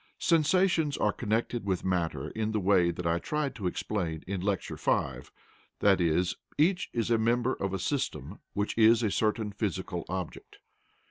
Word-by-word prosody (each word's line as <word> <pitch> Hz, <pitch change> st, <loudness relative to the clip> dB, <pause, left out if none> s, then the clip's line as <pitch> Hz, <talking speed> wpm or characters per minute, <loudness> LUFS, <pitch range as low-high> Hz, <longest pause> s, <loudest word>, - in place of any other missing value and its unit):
Sensations 165 Hz, -2 st, +2 dB
are 105 Hz, -, +1 dB
connected 115 Hz, +1 st, -1 dB
with 95 Hz, -3 st, -2 dB
matter 90 Hz, -3 st, -1 dB
in 110 Hz, 0 st, -2 dB
the 110 Hz, -, +1 dB
way 95 Hz, -3 st, +3 dB
that 85 Hz, 0 st, -4 dB
I 85 Hz, 0 st, +1 dB
tried 150 Hz, -, -2 dB
to 95 Hz, -, -3 dB
explain 85 Hz, -3 st, -3 dB
in 95 Hz, -1 st, -3 dB
Lecture 100 Hz, 0 st, -2 dB
V, -, -, 0 dB, 0.6 s
i.e. 90 Hz, -3 st, +3 dB, 0.3 s
each 180 Hz, +4 st, +2 dB
is 120 Hz, -1 st, -1 dB
a 115 Hz, -, +4 dB
member 120 Hz, +3 st, +2 dB
of 95 Hz, -, -3 dB
a 95 Hz, -, -1 dB
system 95 Hz, -, -3 dB
which 105 Hz, 0 st, -1 dB
is 115 Hz, +1 st, +6 dB
a 105 Hz, -, +1 dB
certain 110 Hz, 0 st, 0 dB
physical 95 Hz, -4 st, -3 dB
object. 90 Hz, -2 st, -6 dB
105 Hz, 160 wpm, -29 LUFS, 90-120 Hz, 0.6 s, is